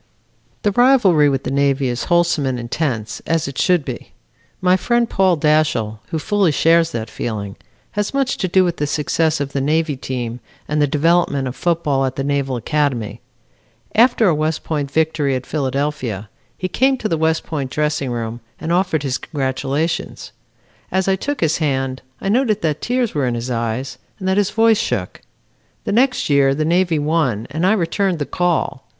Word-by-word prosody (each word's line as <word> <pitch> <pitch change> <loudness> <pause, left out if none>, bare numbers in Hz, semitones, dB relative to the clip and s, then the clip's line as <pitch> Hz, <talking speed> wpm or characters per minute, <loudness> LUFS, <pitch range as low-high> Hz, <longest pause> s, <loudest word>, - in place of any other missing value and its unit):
"The 205 - +2
rivalry 200 - +5
with 135 -1 -1
the - - -3
Navy 140 -1 +1
is 120 0 -2
wholesome 170 -5 +2
and 130 -2 -2
intense, 120 -3 -3
as 165 -3 +1
it 140 -1 -5
should 180 -6 +2
be. 125 -3 -7 0.5
My 185 0 +4
friend, 235 +5 +1
Paul 190 -4 +2
Dashiell, 150 -8 +1
who 160 - -3
fully 200 +1 +1
shares 165 +2 +3
that 115 -1 -4
feeling, 105 -3 -5 0.4
has 210 -1 -2
much 275 -2 0
to 185 - -1
do 185 +1 +4
with 175 -1 -1
the 145 - -1
success 155 +2 0
of 140 -1 -3
the 140 - 0
Navy 155 +1 +1
team, 125 -2 -4 0.3
and 150 0 0
the 145 - +4
development 150 -2 +2
of 125 - -5
football 160 -6 0
at 130 -1 -1
the 135 - -2
Naval 140 -2 -1
Academy. 120 -5 -1 0.7
After 235 -1 +4
a 175 - +4
West 155 +1 -1
Point 145 -3 -2
victory 155 -2 +1
at 130 0 -4
Philadelphia, 135 -7 -2 0.3
he 185 - -2
came 265 +8 +2
to 225 - -2
the 170 - 0
West 160 0 +1
Point 140 -5 -4
dressing 150 -2 -1
room 115 -1 -4 0.2
and 165 - -3
offered 175 -4 +1
his 130 -1 -1
congratulations. 140 +3 -2 0.6
As 190 0 0
I 195 - +3
took 285 +9 -4
his 160 -1 +1
hand, 135 -4 -1 0.2
I - - -4
noted 215 -2 +1
that 155 -2 0
tears 245 -2 0
were 140 -4 0
in 120 - -1
his 120 +2 -4
eyes 115 +3 -3 0.2
and 190 - -5
that 190 +1 +2
his 205 -1 +2
voice 225 0 +3
shook. 100 -7 -3 0.6
The - - -2
next 255 +5 +2
year 140 -2 +3
the 155 +1 -1
Navy 175 0 +2
won 145 -8 0
and 160 +5 0
I 205 - +4
returned 190 -1 0
the 145 - -2
call. 175 -6 -1
150 Hz, 185 wpm, -19 LUFS, 135-180 Hz, 0.7 s, rivalry